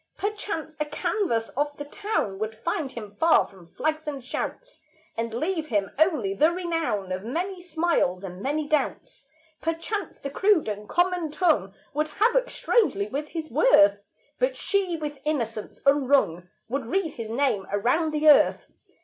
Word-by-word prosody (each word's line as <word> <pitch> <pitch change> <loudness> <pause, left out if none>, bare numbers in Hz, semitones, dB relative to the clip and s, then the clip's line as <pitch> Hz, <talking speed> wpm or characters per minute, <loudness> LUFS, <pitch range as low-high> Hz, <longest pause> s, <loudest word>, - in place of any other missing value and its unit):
Perchance 400 -6 -3
a 300 - +1
canvass 265 - -1
of 290 +1 -2
the 290 - -6
town 295 - -2
Would 215 +1 -3
find 290 +3 -2
him 210 -4 -7
far 330 0 +5
from 185 -4 -16
flags 310 - -2
and 280 -3 -4
shouts, - - -5 0.3
And 230 0 -2
leave 315 +6 -2
him 205 -6 0
only 305 - +2
the 310 +12 +4
renown 330 - -2
Of 185 +1 -3
many 355 - -3
smiles 325 - 0
and 185 -1 -7
many 295 +4 -1
doubts; 300 0 -2 0.4
Perchance 330 +6 -3
the 275 - -6
crude 390 - +3
and 210 0 -5
common 350 -2 +1
tongue 295 - +1 0.2
Would 305 +2 0
havoc 475 +9 +2
strangely 210 - +1
with 290 +5 -3
his 315 -1 -6
worth; 205 - +5 0.4
But - - +1
she, 380 -4 0
with 295 -2 -5
innocence 230 -8 -3
unwrung, 270 - +3 0.2
Would 260 0 -3
read 330 +2 0
his 225 -2 -6
name 230 -6 0
around 250 +11 +2
the 305 0 +1
earth. 295 - +5
300 Hz, 160 wpm, -26 LUFS, 225-340 Hz, 0.4 s, far